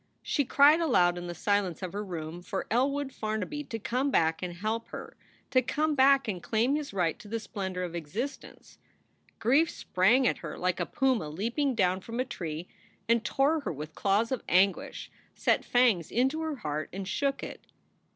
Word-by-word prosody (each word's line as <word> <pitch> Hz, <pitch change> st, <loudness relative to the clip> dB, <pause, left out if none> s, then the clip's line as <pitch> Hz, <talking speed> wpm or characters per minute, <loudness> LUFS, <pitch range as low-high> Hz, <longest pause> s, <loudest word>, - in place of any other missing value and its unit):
She 285 Hz, -, 0 dB
cried 285 Hz, +5 st, +6 dB
aloud 180 Hz, -, +3 dB
in 175 Hz, 0 st, -6 dB
the 175 Hz, -, -5 dB
silence 195 Hz, -2 st, 0 dB
of 185 Hz, -, -4 dB
her 205 Hz, +1 st, -3 dB
room 170 Hz, -3 st, -6 dB
for 190 Hz, +2 st, -4 dB
Elwood 270 Hz, +3 st, +1 dB
Farnaby 220 Hz, +8 st, -3 dB
to 230 Hz, -, -5 dB
come 250 Hz, +6 st, -1 dB
back 160 Hz, -8 st, +2 dB
and 180 Hz, -1 st, -4 dB
help 220 Hz, +5 st, -2 dB
her, -, -, -8 dB, 0.4 s
to 255 Hz, -, +5 dB
come 305 Hz, +5 st, 0 dB
back 275 Hz, -1 st, +5 dB
and 185 Hz, -5 st, -3 dB
claim 235 Hz, +8 st, +1 dB
his 300 Hz, -2 st, -3 dB
right 180 Hz, -4 st, 0 dB
to -, -, -12 dB
the 225 Hz, +2 st, -2 dB
splendor 190 Hz, -3 st, -4 dB
of 175 Hz, -2 st, -5 dB
existence. 195 Hz, -, -6 dB, 0.6 s
Grief 280 Hz, +8 st, +3 dB
sprang 225 Hz, +9 st, +2 dB
at -, -, 0 dB
her 155 Hz, -3 st, -7 dB
like 180 Hz, -1 st, 0 dB
a -, -, -1 dB
puma 255 Hz, -12 st, +1 dB
leaping 235 Hz, -, -1 dB
down 185 Hz, -2 st, +2 dB
from 230 Hz, +5 st, -6 dB
a 255 Hz, -, +1 dB
tree 170 Hz, -7 st, -5 dB, 0.4 s
and 230 Hz, 0 st, +3 dB
tore 285 Hz, +6 st, +2 dB
her 285 Hz, -, -4 dB
with 155 Hz, +1 st, -7 dB
claws 205 Hz, +4 st, +1 dB
of 260 Hz, -, -1 dB
anguish, 190 Hz, +1 st, +1 dB, 0.2 s
set -, -, +2 dB
fangs 235 Hz, -10 st, +3 dB
into 265 Hz, +6 st, +1 dB
her 315 Hz, -2 st, -2 dB
heart 155 Hz, -, -4 dB
and 190 Hz, 0 st, -5 dB
shook 275 Hz, +5 st, -1 dB
it. -, -, -8 dB
220 Hz, 190 wpm, -29 LUFS, 180-265 Hz, 0.6 s, cried